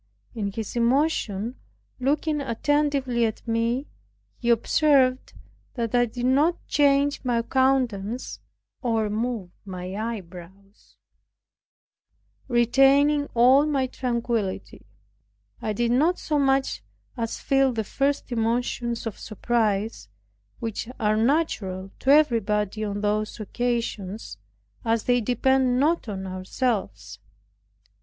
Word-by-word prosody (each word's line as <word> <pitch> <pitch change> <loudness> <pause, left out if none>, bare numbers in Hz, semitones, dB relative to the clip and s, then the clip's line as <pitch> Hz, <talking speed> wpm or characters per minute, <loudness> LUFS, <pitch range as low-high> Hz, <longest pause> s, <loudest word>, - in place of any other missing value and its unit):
In 205 -4 -3
his 220 +2 -6
emotion 240 -3 0 0.4
looking 295 +3 0
attentively 275 -1 0
at 225 +1 -2
me, 230 +4 0 0.5
he 240 - -2
observed 260 +2 +3 0.4
that 235 -2 -2
I 245 0 +3
did 240 +2 -4
not 290 +7 +3
change 285 0 +2
my 240 -2 0
countenance, 250 -4 0 0.4
or 225 -4 0
move 220 -4 -3
my 185 -2 -6
eyebrows, 195 -2 -8 1.5
retaining 275 +4 +4
all 260 +5 +5
my 275 -3 +1
tranquillity. 235 -6 -3 0.7
I 215 - -2
did 235 +3 0
not 310 +9 +3
so 300 -2 -1
much 270 -1 +1 0.3
as 230 -2 -3
feel 270 -1 +2
the 225 -2 -2
first 275 +5 -1
emotions 235 0 -1
of 225 - -5
surprise, 215 - -1 0.5
which 225 0 -4
are 215 -2 +2
natural 215 - 0
to 265 - -2
everybody 220 -8 +3
on 205 -1 -3
those 210 +1 -1
occasions, 215 - -3 0.4
as 225 -1 +1
they 245 -1 +2
depend 255 +2 +2
not 305 -3 +1
on 190 -2 -5
ourselves. 185 - -3
235 Hz, 105 wpm, -25 LUFS, 215-270 Hz, 1.5 s, all